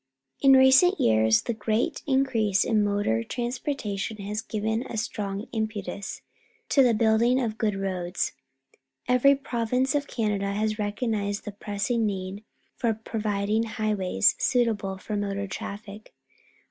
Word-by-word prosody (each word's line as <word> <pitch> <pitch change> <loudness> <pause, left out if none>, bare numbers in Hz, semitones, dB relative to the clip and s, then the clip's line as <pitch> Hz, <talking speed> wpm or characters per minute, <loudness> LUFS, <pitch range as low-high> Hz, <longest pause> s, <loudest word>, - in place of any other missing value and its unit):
In 270 -1 +7
recent 265 +9 +6
years 110 0 +4
the 235 - -2
great 220 +1 -1
increase 250 -7 +2
in 215 -2 +2
motor 200 - 0
transportation 240 - -3
has 210 +1 -4
given 220 +1 -2
a 225 - -5
strong 205 -1 -3
impetus 220 -2 -4 0.5
to 275 - +5
the 245 -3 +4
building 230 +3 +3
of 225 -3 -2
good 210 -2 +1
roads. 185 -2 -2 0.8
Every 250 +3 +5
pro\'ince 250 0 -1
of 285 -1 0
Canada 205 -3 -1
has 215 +1 -1
recognized 205 -1 -2
the 210 - -4
pressing 210 +3 -1
need 195 +1 -4 0.4
of 225 -2 0
providing 210 -1 -1
highways 215 - +1
suitable 220 -6 +1
for 210 +2 -5
motor 200 -1 -2
traffic. 200 +2 -8
215 Hz, 130 wpm, -26 LUFS, 200-235 Hz, 0.8 s, In